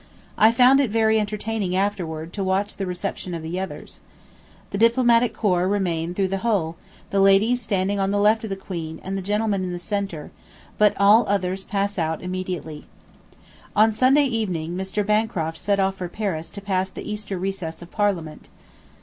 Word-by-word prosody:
I 220 Hz, +1 st, +6 dB
found 255 Hz, +3 st, +6 dB
it 275 Hz, -4 st, +2 dB
very 220 Hz, 0 st, +3 dB
entertaining 210 Hz, -2 st, -2 dB
afterward 175 Hz, -5 st, -2 dB
to 200 Hz, -, -3 dB
watch 190 Hz, +2 st, 0 dB
the 195 Hz, -, -4 dB
reception 180 Hz, 0 st, -4 dB
of 165 Hz, -, -6 dB
the 170 Hz, +3 st, -3 dB
others. 190 Hz, -, -7 dB, 0.7 s
The 200 Hz, -, -3 dB
Diplomatic 235 Hz, 0 st, +4 dB
Corps 185 Hz, -5 st, +1 dB
remain 175 Hz, -4 st, -1 dB
through 195 Hz, -1 st, 0 dB
the 195 Hz, 0 st, -1 dB
whole, 190 Hz, -7 st, 0 dB, 0.4 s
the 195 Hz, -, +1 dB
ladies 200 Hz, +6 st, +4 dB
standing 200 Hz, -2 st, -1 dB
on 195 Hz, 0 st, +1 dB
the 205 Hz, -, 0 dB
left 215 Hz, +2 st, +3 dB
of 220 Hz, -, -4 dB
the 195 Hz, -, -2 dB
Queen 165 Hz, -4 st, -6 dB
and 190 Hz, +1 st, -4 dB
the 195 Hz, -, -2 dB
gentlemen 205 Hz, 0 st, 0 dB
in 180 Hz, -, -3 dB
the 175 Hz, -, -4 dB
centre, 175 Hz, -3 st, -4 dB, 0.5 s
but 210 Hz, -1 st, +5 dB
all 205 Hz, +4 st, +6 dB
others 190 Hz, -1 st, -1 dB
pass 200 Hz, -1 st, -1 dB
out 160 Hz, 0 st, -2 dB
immediately.... 180 Hz, -4 st, -5 dB, 0.9 s
On 215 Hz, +2 st, +5 dB
Sunday 260 Hz, +6 st, +4 dB
evening 185 Hz, -9 st, -2 dB
Mr. 190 Hz, +2 st, -2 dB
Bancroft 210 Hz, -7 st, 0 dB
set 200 Hz, -1 st, 0 dB
off 195 Hz, 0 st, +1 dB
for 180 Hz, -2 st, -5 dB
Paris 175 Hz, -5 st, -3 dB
to 200 Hz, -, -9 dB
pass 190 Hz, -1 st, -1 dB
the -, -, -9 dB
Easter 210 Hz, -2 st, -4 dB
recess 180 Hz, -3 st, -4 dB
of 175 Hz, -, -14 dB
Parliament. 185 Hz, -7 st, -2 dB
195 Hz, 180 wpm, -23 LUFS, 180-210 Hz, 0.9 s, I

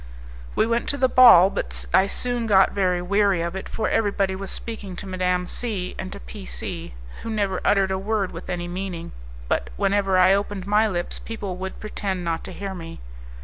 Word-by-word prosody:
We -, -, +3 dB
went 235 Hz, +1 st, 0 dB
to 285 Hz, -, -1 dB
the 260 Hz, -, +3 dB
ball; 235 Hz, -8 st, +8 dB
but -, -, -3 dB
I 190 Hz, +1 st, +5 dB
soon 245 Hz, +2 st, -1 dB
got 195 Hz, -3 st, +5 dB
very 180 Hz, -3 st, 0 dB
weary 200 Hz, -1 st, +2 dB
of 170 Hz, +2 st, -3 dB
it, 190 Hz, -, -6 dB
for 220 Hz, -, -2 dB
every 215 Hz, -2 st, +2 dB
body 195 Hz, -1 st, 0 dB
was 195 Hz, 0 st, -6 dB
speaking 210 Hz, -5 st, -3 dB
to 200 Hz, -, -7 dB
Madame 180 Hz, -1 st, 0 dB
C 200 Hz, -4 st, -3 dB
and 190 Hz, -, -5 dB
to -, -, -7 dB
P -, -, -10 dB
C, -, -, -6 dB, 0.3 s
who 230 Hz, -, -6 dB
never 200 Hz, -4 st, -1 dB
uttered 195 Hz, -1 st, +3 dB
a 190 Hz, -, -1 dB
word 200 Hz, -1 st, -1 dB
with -, -, -9 dB
any 175 Hz, -1 st, -3 dB
meaning, 180 Hz, -1 st, -5 dB, 0.4 s
but 60 Hz, -, -1 dB
whenever 195 Hz, -1 st, +2 dB
I 185 Hz, +1 st, +6 dB
opened 200 Hz, -1 st, -2 dB
my 210 Hz, +2 st, +3 dB
lips 175 Hz, -4 st, -3 dB
people 205 Hz, -5 st, -5 dB
would 190 Hz, +1 st, -6 dB
pretend 195 Hz, -3 st, -3 dB
not 165 Hz, -1 st, -2 dB
to -, -, -7 dB
hear 200 Hz, -1 st, -5 dB
me. 165 Hz, -3 st, -8 dB
190 Hz, 205 wpm, -23 LUFS, 180-205 Hz, 0.4 s, ball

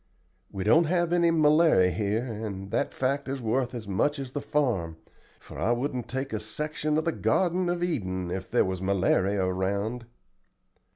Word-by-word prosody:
We 95 Hz, -, -4 dB
don't 160 Hz, -, +5 dB
have 175 Hz, +1 st, +1 dB
any 170 Hz, -1 st, +4 dB
malary 155 Hz, -, +4 dB
here, 105 Hz, +5 st, -1 dB
and 105 Hz, -4 st, -6 dB
that -, -, 0 dB
fact 135 Hz, +1 st, -1 dB
is 135 Hz, 0 st, -3 dB
worth 125 Hz, +2 st, -1 dB
as 110 Hz, -4 st, -6 dB
much 145 Hz, +10 st, 0 dB
as 135 Hz, -2 st, -6 dB
the 145 Hz, -, -3 dB
farm, 105 Hz, -, -1 dB, 0.4 s
for -, -, -11 dB
I 120 Hz, -, +2 dB
wouldn't 125 Hz, -1 st, -3 dB
take 135 Hz, 0 st, -4 dB
a 110 Hz, -, -1 dB
section 150 Hz, +7 st, -2 dB
of 155 Hz, -, 0 dB
the 165 Hz, -, +2 dB
garden 180 Hz, +1 st, +1 dB
of 175 Hz, 0 st, -1 dB
Eden 95 Hz, -, -2 dB
if 95 Hz, +1 st, -4 dB
there -, -, +3 dB
was 95 Hz, -1 st, -3 dB
malary 95 Hz, +1 st, +1 dB
around." 100 Hz, +5 st, -1 dB
120 Hz, 175 wpm, -27 LUFS, 100-150 Hz, 0.4 s, don't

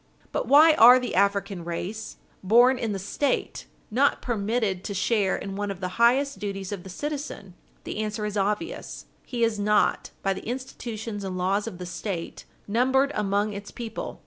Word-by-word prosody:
But -, -, -2 dB
why 310 Hz, +3 st, +7 dB
are 245 Hz, -2 st, +9 dB
the 250 Hz, -, -4 dB
African 200 Hz, -2 st, +1 dB
race, 185 Hz, +6 st, -5 dB, 0.3 s
born 240 Hz, +6 st, +5 dB
in 225 Hz, -3 st, -1 dB
the 200 Hz, -, -2 dB
State, 255 Hz, +8 st, -2 dB, 0.2 s
not 270 Hz, +6 st, +3 dB
permitted 215 Hz, -4 st, -1 dB
to 200 Hz, -, -4 dB
share 200 Hz, 0 st, +1 dB
in 195 Hz, -1 st, -5 dB
one 205 Hz, 0 st, -2 dB
of 195 Hz, -2 st, -5 dB
the 185 Hz, +4 st, -4 dB
highest 270 Hz, +4 st, +3 dB
duties 195 Hz, -2 st, -4 dB
of 200 Hz, -3 st, -4 dB
the 190 Hz, -, -11 dB
citizen? 280 Hz, -, -5 dB, 0.3 s
The -, -, -5 dB
answer 215 Hz, 0 st, -2 dB
is 210 Hz, 0 st, -4 dB
obvious; 210 Hz, -, -2 dB, 0.2 s
he 240 Hz, -2 st, -1 dB
is 225 Hz, -2 st, +1 dB
not, 210 Hz, +1 st, +2 dB
by 195 Hz, -, +2 dB
the 190 Hz, -, -9 dB
institutions 230 Hz, -4 st, -5 dB
and 185 Hz, -1 st, -4 dB
laws 195 Hz, +4 st, 0 dB
of 200 Hz, -6 st, -6 dB
the 180 Hz, -, -6 dB
State, 180 Hz, -1 st, -5 dB, 0.2 s
numbered 260 Hz, +6 st, +2 dB
among 205 Hz, -1 st, 0 dB
its 200 Hz, 0 st, -7 dB
people. 235 Hz, -2 st, -6 dB
210 Hz, 175 wpm, -26 LUFS, 195-240 Hz, 0.3 s, are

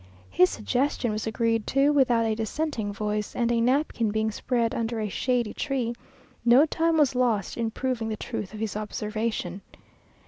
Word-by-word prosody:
His 180 Hz, -, +5 dB
suggestion 250 Hz, +1 st, -1 dB
was 215 Hz, +1 st, -3 dB
agreed 225 Hz, 0 st, 0 dB
to 275 Hz, +2 st, +3 dB
without 245 Hz, -5 st, +3 dB
a 220 Hz, -, +1 dB
dissenting 225 Hz, 0 st, -2 dB
voice, 210 Hz, +1 st, -3 dB
and 235 Hz, -1 st, +1 dB
a 235 Hz, -1 st, +2 dB
napkin 250 Hz, -2 st, +1 dB
being 220 Hz, +1 st, 0 dB
spread 235 Hz, +1 st, 0 dB
under 230 Hz, 0 st, -2 dB
a 215 Hz, -, -1 dB
shady 240 Hz, +1 st, 0 dB
tree, 260 Hz, -5 st, -2 dB, 0.5 s
no 245 Hz, +5 st, +6 dB
time 325 Hz, +1 st, +1 dB
was 290 Hz, -4 st, +4 dB
lost 235 Hz, -6 st, 0 dB
in 230 Hz, -1 st, -1 dB
proving 240 Hz, -1 st, -2 dB
the 215 Hz, -, -3 dB
truth 190 Hz, -, -5 dB
of 215 Hz, -, -8 dB
his 220 Hz, -2 st, -3 dB
observation. 210 Hz, -3 st, -3 dB
230 Hz, 170 wpm, -26 LUFS, 215-255 Hz, 0.5 s, no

